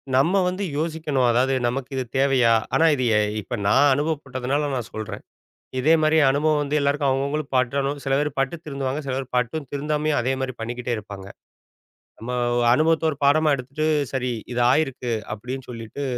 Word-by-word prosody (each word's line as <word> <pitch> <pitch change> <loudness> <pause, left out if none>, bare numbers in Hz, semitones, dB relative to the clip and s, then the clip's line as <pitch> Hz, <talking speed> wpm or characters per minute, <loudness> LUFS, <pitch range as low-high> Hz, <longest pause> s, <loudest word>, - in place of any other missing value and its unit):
நம்ம 165 +9 +3
வந்து 185 +2 -2
யோசிக்கணும். 155 -5 0
அதாவது, 130 +3 +2
"நமக்கு 130 +2 -3
இது 130 - 0
தேவையா?" 135 -4 +4 0.2
ஆனா 165 - +4
இது 130 - -2
எ - - +4 0.2
இப்ப 120 - -5
நான் 145 +7 +5
அனுபவப்பட்டதனால 145 -1 -1
நான் 120 -3 -4
சொல்றேன். 110 -1 -6 0.6
இதே 155 +5 +4
மாரி 155 +1 +3
அனுபவம் 150 +2 +2
வந்து 145 +1 -3
எல்லோருக்கும் 140 0 +1
அவுங்க 135 +1 0
அவுங்களுக்கு 145 -1 -3
பட்டுறனும். 140 +3 0
சில 135 -1 +1
பேர் 150 +1 0
பட்டு 135 +5 -1
திருந்துவாங்க. 140 -1 -3
சில 130 - -2
பேர் 135 0 -3
பட்டும் 130 +5 -1
திருந்தாமயே, 150 +1 -1
அதே 125 +2 0
மாரி 130 -1 -2
பண்ணிக்கிட்டே 120 +1 -4
இருப்பாங்க. 100 -2 -9 0.9
நம்ம 120 +3 -6 0.3
ஒ 120 - +2
அனுபவத்த 160 +4 +2
ஒரு 145 - -4
பாடமா 155 +2 +4
எடுத்துட்டு, 140 +4 -4 0.3
"சரி 125 -1 -1 0.2
இது 120 - 0
ஆயிருக்கு." 130 -4 0 0.2
அப்படின்னு 125 +5 -6
சொல்லிட்டு, 115 +3 -7
135 Hz, 170 wpm, -23 LUFS, 125-150 Hz, 0.9 s, நான்